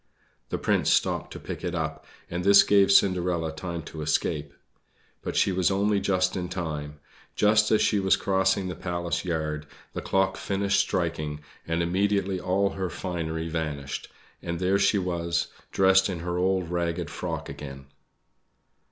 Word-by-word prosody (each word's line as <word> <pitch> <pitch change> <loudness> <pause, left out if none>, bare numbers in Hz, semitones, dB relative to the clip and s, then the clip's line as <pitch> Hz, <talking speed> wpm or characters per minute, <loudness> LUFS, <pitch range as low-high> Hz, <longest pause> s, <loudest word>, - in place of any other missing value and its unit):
The - - -1
Prince - - +1
stopped - - +1
to - - -7
pick - - -7
it - - -2
up, - - -4 0.2
and 90 +1 -3
this 100 +1 +8
gave 100 -1 +4
Cinderella 90 -4 +3
time 85 +1 -5
to 80 +1 -8
escape; 75 -1 -1 0.7
but - - -4
she - - +3
was 90 -1 +2
only 100 +1 +2
just 95 -1 +1
in 90 -1 -3
time. 75 -5 -4 0.4
Just 105 0 +4
as 110 -1 +4
she 105 - +2
was 95 -1 +4
crossing 95 0 +1
the 90 - -3
Palace 85 -2 -3
yard, 75 -4 -2 0.3
the - - -4
clock 95 0 +1
finished 100 0 0
striking, 75 -4 -1 0.3
and 85 +1 0
immediately 95 +1 +1
all 95 +2 +1
her 95 -2 -3
finery 80 -2 -3
vanished; 75 -4 -4 0.3
and 85 0 -3
there 95 +2 +2
she 100 +1 +3
was, 85 -2 -1 0.2
dressed 95 0 +4
in 90 -3 -4
her 90 0 -3
old 90 -1 0
ragged 85 0 -2
frock - - -4
again. 70 -2 -8
90 Hz, 160 wpm, -26 LUFS, 80-95 Hz, 0.7 s, this